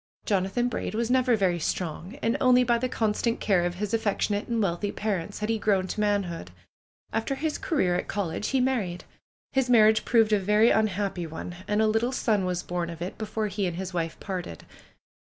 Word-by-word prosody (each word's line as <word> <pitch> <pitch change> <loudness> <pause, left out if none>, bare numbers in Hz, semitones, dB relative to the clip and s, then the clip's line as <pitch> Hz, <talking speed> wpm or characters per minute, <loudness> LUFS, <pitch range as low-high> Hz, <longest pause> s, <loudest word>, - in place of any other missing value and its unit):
Jonathan 200 +5 +1
Braid 225 -2 -3
was 235 +1 0
never 255 -2 +4
very 185 -4 +1
strong, 175 - -3
and 230 +2 +2
only 250 -1 +5
by 235 -1 +2
the 255 +1 -1
constant 230 0 0
care 190 -4 +2
of 175 0 -1
his 205 +3 -3
affectionate 205 -2 0
and 235 -1 -1
wealthy 200 0 0
par 210 -3 -1
ents 170 +5 -8
had 210 - -1
he 225 -1 +1
grown 195 -3 +2
to 190 - -5
manhood. 200 - -1 0.6
After 225 +5 -1
his 310 +2 -2
career 185 - +1
at 175 - -1
col 200 -4 -2
lege 165 +6 -3
he 265 - +1
married. 225 -9 -1 0.5
His 265 -2 +1
marriage 220 -2 +5
proved 225 -3 +3
a 210 - +4
very 210 +4 +4
unhappy 200 -4 0
one. 160 +2 -7
And 210 +1 +2
a - - +3
little 225 +3 +1
son 215 -6 +1
was 180 -1 -2
born 175 -1 -3
of 170 -1 -8
it 180 +3 -6
before 215 0 -2
he 200 -1 -1
and 175 - -3
his 190 0 -5
wife 165 -2 -3
parted. 180 - -6
210 Hz, 205 wpm, -27 LUFS, 180-225 Hz, 0.6 s, only